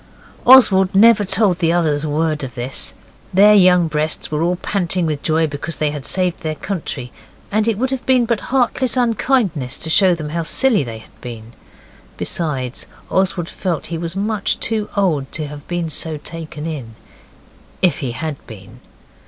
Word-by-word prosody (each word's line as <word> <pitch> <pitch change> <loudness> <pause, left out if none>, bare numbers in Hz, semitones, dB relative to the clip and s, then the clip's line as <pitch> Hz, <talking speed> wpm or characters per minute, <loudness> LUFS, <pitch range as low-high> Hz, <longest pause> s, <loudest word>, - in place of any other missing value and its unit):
Oswald 195 -8 +6
never 215 +1 +6
told 190 -2 +1
the 165 -2 +2
others 155 -4 +1
a 155 - -2
word 155 0 -1
of 130 -2 -7
this. 125 +2 -4 0.4
Their 205 +3 +6
young 180 -4 +5
breasts 155 0 -2
were 150 0 -1
all 175 +2 +1
panting 180 -1 -1
with 150 -3 -2
joy 160 0 +1
because 150 +2 -5
they 150 -1 0
had 145 -2 -6
saved 180 -2 0
their 155 -1 -3
country; 150 -9 -5 0.4
and 215 +2 +1
it 225 -3 +1
would 260 +3 -1
have 265 -2 -3
been 255 -2 +4
but 230 -2 0
heartless 255 0 +1
unkindness 220 - 0
to 160 - -4
show 185 -1 +5
them 155 -3 -6
how 170 +2 -2
silly 215 - +2
they 115 -3 -7
had 110 - -18
been. 115 -2 -9 0.6
Besides, 135 -7 -2 0.2
Oswald 185 -2 0
felt 175 -4 -3
he - - -1
was 170 +1 -4
much 205 +1 -1
too 215 -2 -2
old 155 -9 0
to 155 - -2
have 145 0 -10
been 175 -1 -2
so 155 0 -2
taken 155 -1 -7
in 135 -9 -6 0.9
if 175 -6 +3
he 130 -6 -3
HAD 155 +3 -4
been. 95 -4 -12
165 Hz, 175 wpm, -18 LUFS, 150-200 Hz, 0.9 s, Oswald